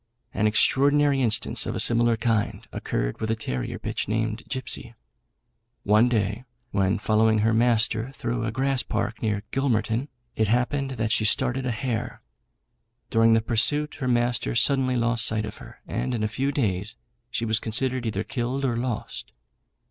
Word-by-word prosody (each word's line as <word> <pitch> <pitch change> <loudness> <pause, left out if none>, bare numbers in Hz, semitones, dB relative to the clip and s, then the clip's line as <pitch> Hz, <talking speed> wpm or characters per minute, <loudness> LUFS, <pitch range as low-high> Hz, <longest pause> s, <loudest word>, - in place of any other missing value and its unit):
An 105 - +1
extraordinary 140 +5 +3
instance 115 -4 +1
of - - -3
a - - -2
similar 120 -1 +4
kind 110 -2 -1
occurred - - -3
with 110 - -2
a 110 - +1
terrier 65 - -4
bitch, - - -4
named 110 +1 -1
Gipsy. 130 -3 -3 0.9
One 110 +4 +4
day, 110 0 -1 0.3
when 95 -1 +1
following 110 +1 +2
her 115 - +3
master 115 0 +2
through 120 -2 -3
a 115 - -2
grass 135 +2 0
park 90 - -3
near 105 -2 -1
Gilmerton, 120 -1 0 0.3
it 110 - +1
happened 125 +5 0
that 110 0 -1
she 110 - +2
started 125 +4 +2
a - - 0
hare. 120 +1 -3 0.9
During 115 0 +5
the 115 - +4
pursuit 145 +7 +1
her 130 - -2
master 120 -1 +1
suddenly 130 +2 +2
lost 115 -1 +2
sight 110 -1 +1
of 105 - -8
her, - - -13
and 125 +4 -2
in 110 - -2
a - - +2
few 130 +6 -1
days 105 - -1 0.3
she 115 -1 -2
was 110 0 +2
considered 125 +2 -1
either 105 -1 -2
killed 130 +3 -2
or 120 -3 0
lost. 115 - -4
115 Hz, 165 wpm, -25 LUFS, 110-125 Hz, 0.9 s, During